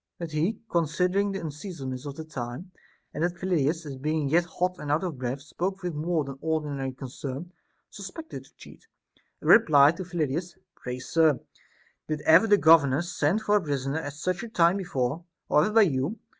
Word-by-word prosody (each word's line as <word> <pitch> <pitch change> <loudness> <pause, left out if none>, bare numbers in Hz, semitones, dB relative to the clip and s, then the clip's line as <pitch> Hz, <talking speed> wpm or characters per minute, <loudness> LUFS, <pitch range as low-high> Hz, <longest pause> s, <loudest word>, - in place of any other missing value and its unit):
But 170 -2 -6
he, 160 +8 0
considering 180 +4 +1
the 195 - -4
unseasonableness 145 -4 -6
of 140 - -6
the 160 - -6
time, 140 +3 -7 0.4
and 155 - -2
that 175 0 0
Phyllidas, 165 -3 0
as 140 -3 -7
being 150 +1 -1
yet 170 +4 +3
hot 180 +1 -2
and 145 - -4
out 155 +5 +1
of 165 -8 -4
breath, 130 +2 -3
spoke 185 +6 -4
with 175 -2 -2
more 160 +1 0
than 135 -1 -8
ordinary 150 -4 -2
concern, 135 +5 -7 0.4
suspected 205 - -8
the - - -20
cheat, - - -15 0.5
and - - -6
replied 155 -6 +6
to 185 - -4
Phyllidas: 170 0 -3 0.2
Pray, 125 0 -6
sir, 155 +1 +2 0.7
did 155 -1 -3
ever 165 +9 +6
the 205 -1 +5
governors 160 -1 +4
send 165 +9 +1
for 210 0 +3
a - - 0
prisoner 140 -1 -2
at 145 -3 -6
such 175 +4 -2
a 235 - -7
time 175 -2 +3
before 145 -4 -2 0.3
I - - -3
Or 150 - +5
ever 210 - -2
by 225 - +8
you 150 - 0
160 Hz, 190 wpm, -27 LUFS, 140-180 Hz, 0.7 s, by